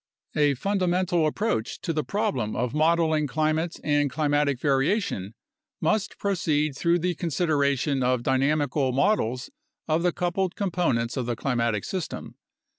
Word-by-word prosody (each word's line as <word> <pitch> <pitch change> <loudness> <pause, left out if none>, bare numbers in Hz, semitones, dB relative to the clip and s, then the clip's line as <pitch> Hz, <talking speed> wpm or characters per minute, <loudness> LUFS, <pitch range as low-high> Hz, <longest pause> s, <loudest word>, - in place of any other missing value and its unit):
A 145 -2 +3
fundamental 180 -1 +1
approach 170 - -1
to 165 - -2
the 155 -1 -1
problem 200 - -1
of 125 +1 -1
modeling 160 -1 +2
climate 155 +4 -1
and 145 -1 +2
climatic 145 -2 +1
variation 135 - 0 0.4
must 215 -2 0
proceed 155 -7 0
through 170 +5 +2
the 180 +1 0
consideration 145 -4 0
of 125 -1 +1
dynamical 135 0 +1
models 130 - +1 0.4
of 160 +1 +1
the 175 0 +2
coupled 180 +1 -1
components 165 - 0
of 125 -2 -2
the 120 - -1
climatic 115 -4 -1
system. 185 -4 -5
150 Hz, 130 wpm, -26 LUFS, 130-175 Hz, 0.4 s, A